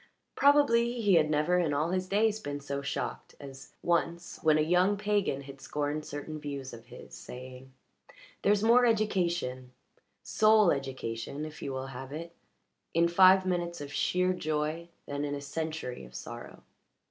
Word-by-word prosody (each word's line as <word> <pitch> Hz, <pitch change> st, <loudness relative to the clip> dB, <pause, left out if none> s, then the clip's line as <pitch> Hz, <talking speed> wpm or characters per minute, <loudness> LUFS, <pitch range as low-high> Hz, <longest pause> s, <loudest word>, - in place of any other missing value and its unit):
Probably 245 Hz, -4 st, +4 dB
he 205 Hz, -4 st, +3 dB
had 155 Hz, -3 st, +4 dB
never 155 Hz, +4 st, +2 dB
in 155 Hz, -5 st, +1 dB
all 155 Hz, +4 st, 0 dB
his 185 Hz, 0 st, -1 dB
days 215 Hz, +2 st, +2 dB
been 145 Hz, -7 st, -5 dB
so 140 Hz, 0 st, -4 dB
shocked 140 Hz, -, -4 dB
as 135 Hz, -1 st, -11 dB
once 170 Hz, 0 st, -1 dB
when 155 Hz, -1 st, +4 dB
a -, -, +3 dB
young 180 Hz, +5 st, +3 dB
pagan 205 Hz, -8 st, 0 dB
had 135 Hz, 0 st, -11 dB
scorned 150 Hz, +1 st, -3 dB
certain 155 Hz, +2 st, -6 dB
views 140 Hz, -3 st, -6 dB
of 115 Hz, 0 st, -12 dB
his, 125 Hz, -, -12 dB
saying; 130 Hz, +1 st, -10 dB, 0.7 s
"There's 205 Hz, +1 st, +3 dB
more 235 Hz, +2 st, +6 dB
education 175 Hz, -, 0 dB, 0.5 s
soul 215 Hz, -3 st, +4 dB
education, 135 Hz, 0 st, -4 dB
if 155 Hz, -1 st, -10 dB
you 140 Hz, -, -4 dB
will 130 Hz, 0 st, -4 dB
have 130 Hz, +2 st, -8 dB
it 165 Hz, +3 st, -7 dB, 0.6 s
in 170 Hz, +1 st, +4 dB
five 185 Hz, +2 st, +6 dB
minutes 175 Hz, -2 st, -2 dB
of 145 Hz, 0 st, -7 dB
sheer 180 Hz, 0 st, +1 dB
joy 155 Hz, 0 st, -2 dB, 0.2 s
than 145 Hz, 0 st, -4 dB
in 145 Hz, -1 st, -2 dB
a -, -, -4 dB
century 155 Hz, -, -4 dB
of -, -, -13 dB
sorrow." -, -, -9 dB
155 Hz, 160 wpm, -30 LUFS, 140-185 Hz, 0.7 s, more